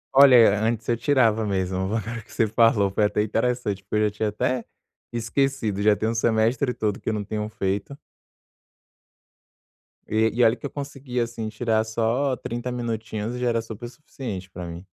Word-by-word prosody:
Olha, 125 -7 +7
antes 110 0 -1
eu 120 - +2
tirava 115 -4 +2
mesmo 95 -3 -1
o - - -2
valor 115 +3 -3
que - - -20
você 115 - +2
falou, 110 -2 +3
foi 105 +2 +2
até 105 0 +1
interessante, 110 -2 -1
porque 100 +2 -5
eu 105 - +3
já - - -11
tinha 105 +1 -1
até 120 +4 -1 0.5
esquecido, 120 -3 -1
já 105 0 +5
tem 110 - -2
o 115 - 0
semestre 115 +3 +1
todo 105 -4 -2
que - - -3
eu - - 0
não 105 -1 -2
tenho 105 +1 -4
feito. 100 +6 -3 2.1
E, 110 +1 +2
e 120 +2 +2
olha 115 0 +5
que - - -10
eu - - -2
consegui 135 -3 -5
assim 115 -2 -2
tirar 110 0 0
só 115 +5 0
30 120 +1 -5
minutinhos 115 -2 -3
e - - -5
já 125 - 0
era 115 -1 +1
super 115 +1 -8
suficiente 120 -8 -7
para 90 -1 -7
mim. 85 +2 -8
110 Hz, 190 wpm, -24 LUFS, 105-120 Hz, 2.1 s, Olha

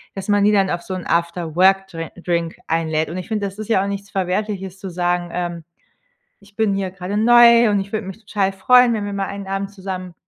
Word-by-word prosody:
dass 195 +1 -6
man 205 0 +3
die 210 - +4
dann 195 -2 +2
auf 170 - -2
so 185 - -6
'n 185 - -6
After-Work-Dre 170 +1 +1
Drink 170 -2 -2
einlädt. 160 -1 -1
Und 175 - -5
ich 185 - -6
finde, 210 -2 -2
das 195 +1 -7
ist 215 - -5
ja 195 -4 +3
auch - - -3
nichts 200 0 -5
Verwerfliches 190 0 -3
zu 190 - -6
sagen, 175 0 -1
ähm: 175 -1 -4 0.8
„Ich 200 0 -22
bin 215 -2 +1
hier 195 -2 -2
gerade 190 +2 -5
neu 235 0 +6
und 205 - +2
ich 195 +1 -6
würde 215 0 -3
mich 190 +2 -8
total 200 -2 -1
freuen, 245 +5 +4
wenn 215 -2 -2
wir 205 - -4
mal 195 0 -2
einen 200 0 -7
Abend 195 0 -3
zusammen 185 -2 -6
195 Hz, 230 wpm, -20 LUFS, 180-205 Hz, 0.8 s, neu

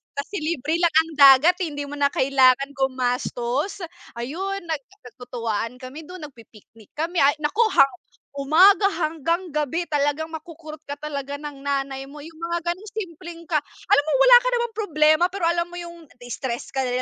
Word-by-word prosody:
Kasi 285 +9 -5
libre 310 0 -1
lang 340 -3 +2
ang 320 +1 +3
dagat 280 +6 +7
hindi 300 -5 -3
mo 290 - -7
na 280 0 +1
kailangan 270 0 +3
gumastos, 255 +5 -2 0.3
ayun, 370 +12 -4
nag 320 -3 -3 0.3
nagtutuwaan 230 -2 -4
kami 285 +5 -9
dun 365 -2 -10
nagpi-picnic 225 -5 -15
kami 335 +4 -3
ay 280 +1 +5
naku 300 +10 -2
hap 275 0 +6 0.5
umaga 360 +9 +5
hanggang 330 +2 -1
gabi 300 +3 -1
talagang 290 +1 -1
makukurot 315 -1 -9
ka 285 - -4
talaga 285 -2 -5
ng 290 -2 -9
nanay 275 -1 -2
mo, 280 +2 -12
yung 320 +2 -12
mga 340 +1 -4
ganong 390 +5 -9
simpleng 345 -4 -7
ka 325 - -2 0.4
alam 285 - +5
mo - - 0
wala - - +9
ka - - -1
naman 475 -1 -1
problema 310 -5 +2
pero 390 -3 -6
alam 340 0 0
mo - - -10
yung 340 -1 -10 0.2
na-stress 245 0 -5
ka 270 - -3
ka - - -2
lil 245 - -2
300 Hz, 175 wpm, -23 LUFS, 270-340 Hz, 0.5 s, wala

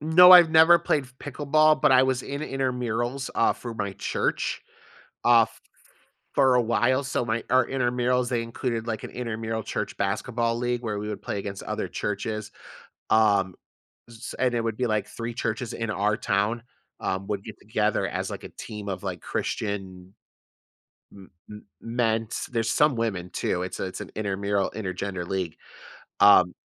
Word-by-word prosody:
No, 175 +4 +8
I've 175 -3 +9
never 160 +2 +7
played 155 -4 0
f 125 0 -18
pickleball, 150 +2 +2
but - - +5
I 130 0 +7
was 130 -1 0
in 140 +1 -5
intermurals, 125 -1 -2
uh, 115 - +3
for 120 -2 -8
my 100 -2 -3
church, - - -2 0.6
uh, 120 -1 +7
f 110 - -1
f - - -21 0.7
for 135 -2 +4
a 125 - +4
while, 120 +3 +2
so, 125 - -1
my 110 0 -1
our 130 -1 +4
intermurals, 125 -1 0
they 120 -2 0
included 115 0 -3
like 110 -2 -3
an - - -7
intermural 115 -2 -4
church - - -4
basketball 115 +4 -1
league 120 0 -1
where 105 -3 -3
we 105 - -4
would 105 - -5
play - - -3
against 100 0 -6
other - - -3
churches. 105 +1 -4 0.6
Um, 100 -4 +3 0.6
z 120 - -13
s 120 - -7
and 125 -1 +2
it 120 -1 0
would 115 -1 -2
be 125 - 0
like 110 -1 -1
3 115 +1 -6
churches 115 +1 -3
in 115 -1 -4
our 105 0 +1
town, 105 +4 0 0.4
um, 95 +1 -3
would 100 -2 -3
get 110 -1 -9
together 105 0 0
as - - -3
like - - -7
a - - -8
team 105 -2 -8
of 95 -1 -5
like 95 -3 -4
Christian 95 -3 -4 1.0
m 95 -1 -14 0.2
m 105 0 -10 0.2
men's 115 -1 -1
there's 115 -2 0
some 150 -2 +3
women 95 -6 -2
too, 90 0 -1
it's 90 - -5
a - - -1
it's 95 - -7
an - - -7
intermural, 100 -1 -1
intergender 95 -3 -4
league. 90 -3 -3 0.6
Um 90 -3 +7
115 Hz, 180 wpm, -26 LUFS, 100-125 Hz, 1.0 s, I've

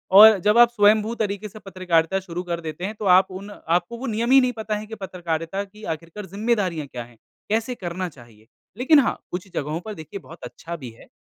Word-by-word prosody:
और 215 +1 +10
जब 210 +4 +3
आप 240 0 +8
स्वयंभू 215 0 +3
तरीक़े 210 -1 -3
से 215 - -12
पत्रकारिता 185 -2 0
शुरू 180 -1 -6
कर 170 -1 -3
देते 160 +3 -5
हैं 215 +2 -4
तो 210 - -6
आप 190 0 +2
उन 195 +2 -8
आपको 175 +4 -1
वो 265 - -6
नियम 230 +3 -1
ही 270 - +8
नहीं 255 -1 +1
पता 220 -2 -3
है 210 +1 -5
कि 225 - -7
पत्रकारिता 180 -1 -3
की 210 +2 -16
आख़िरकार 165 +5 -6
ज़िम्मेदारियाँ 195 -6 -1
क्या 125 -2 -6
हैं। 120 0 -18 0.3
कैसे 225 +4 0
करना 180 -2 -4
चाहिए। 115 -6 -18 0.3
लेकिन 285 +5 +5
हाँ, 255 - +1
कुछ 180 +2 -5
जगहों 150 +3 -2
पर 215 +2 -7
देखिए 160 +3 -8
बहुत 165 -1 -14
अच्छा 170 +1 -7
भी 135 -7 -8
है। 115 - -17
195 Hz, 220 wpm, -23 LUFS, 165-215 Hz, 0.3 s, और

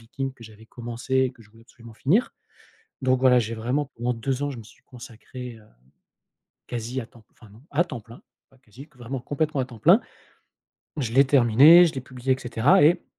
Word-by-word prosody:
vikings 135 +4 -6
que 120 - -17
j'avais 110 0 -15
commencé 120 +2 -7
et 130 -1 +2
que 125 - -22
je 105 - -22
voulais 115 +1 -20
absolument 115 -1 -16
finir 175 - +1 0.7
donc, 130 -1 +1
voilà, 130 -1 +5
j'ai 115 -1 -2
vraiment 130 +6 -3
pendant 120 +2 -2
2 130 +3 -3
ans, 145 - -2
je 130 - -8
me 115 - -11
suis 110 - -20
consacré, 125 0 -11
hem, 110 -1 -20 1.0
quasi 120 +2 -4
à 115 - -8
temps 115 -1 -21
enfin, 110 - -19
non, 105 +3 -17
à 150 +4 +3
temps 130 -9 -8
plein, 115 +2 -16 0.3
pas 135 - -25
quasi, 130 +5 -15
vraiment, 125 +2 -6
complètement 145 +3 -2
à - - -1
temps 120 -3 -14
plein. 175 - +5 1.0
Je 120 -6 -3
l'ai 135 +2 +5
terminé, 140 +7 +6
je 155 - -6
l'ai 130 - -4
publié 130 0 -4
et - - -4
cetera 125 +3 +2
et 165 +4 +3
125 Hz, 210 wpm, -24 LUFS, 115-135 Hz, 1.0 s, terminé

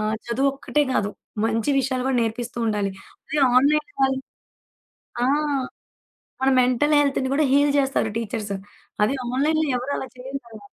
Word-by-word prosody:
ఆహ్, 215 +1 0
చదువొక్కటే 275 +4 0
కాదు, 205 -4 0 0.3
మంచి 225 +4 +1
విషయాలు 260 -1 0
కూడా 265 -1 +1
నేర్పిస్తూ 235 +1 -3
ఉండాలి. 205 -2 0 0.4
అదే 305 - -1 0.2
ఆన్‌లైన్‌లో 300 +9 +3
వాళ్ళు 265 0 +2 1.0
ఆ! - - +3 1.2
మన 265 - +4
మెంటల్ 255 +4 +2
హెల్త్‌ని 275 -2 +1
కూడా 305 - +3
హీల్ 285 +1 +4
చేస్తారు 270 -5 +1
టీచర్స్. 215 -2 -3 0.5
అది 215 - +2 0.2
ఆన్‌లైన్‌లో 310 +5 +1
ఎవరు 255 +3 -3
అలా 265 - -5
చేయరు 265 +2 -6
కదా! 220 -2 -12
260 Hz, 140 wpm, -23 LUFS, 230-280 Hz, 1.2 s, మన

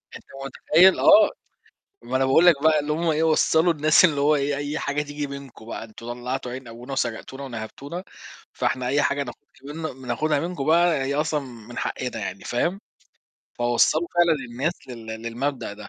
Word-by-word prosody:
أنت - - -12 0.2
مُتخيّل؟ 170 +7 +4
آه، 315 0 +7 0.7
ما - - -2
أنا 135 - +2
باقول 135 +6 +4
لك 155 -5 +5
بقى 155 -1 +4
إن 145 +1 -5
هم 165 +2 0
إيه 155 0 +1
وصّلوا 160 +1 +3
الناس 155 +3 +4
إن 150 -5 +3
هو 145 +2 +4
إيه، 140 0 -1
أي 145 +1 -3
حاجة 145 +1 -1
تيجي 145 0 -5
منكم 140 -5 -10
بقى، 115 - -6
أنتم 115 +1 -12
طلّعتوا 125 +1 -4
عين 130 -1 -8
أبونا 120 +4 -9
وسَرقتونا 135 +1 -3
ونَهبتونا، 135 - -7 0.5
فإحنا 130 -1 -1
أي 140 +3 +2
حاجة 140 0 +1
ناخدها 140 +2 -11 0.2
من 130 - -15
بناخدها 140 +4 0
منكم 170 -4 -4
بقى 170 +1 +4
هي 140 - -1
أصلًا 150 0 0
من 120 -3 -10
حقّنا 125 -3 -3
يعني، 100 -1 -6
فاهم، 175 +11 -1 0.8
فوصّلوا 120 +7 +2
فعلًا 175 -1 +4 0.2
الناس 135 +8 -1 0.2
لل 115 -3 -9 0.2
للمبدأ 120 +1 -3
ده، 105 +1 -10
140 Hz, 180 wpm, -24 LUFS, 125-155 Hz, 0.8 s, آه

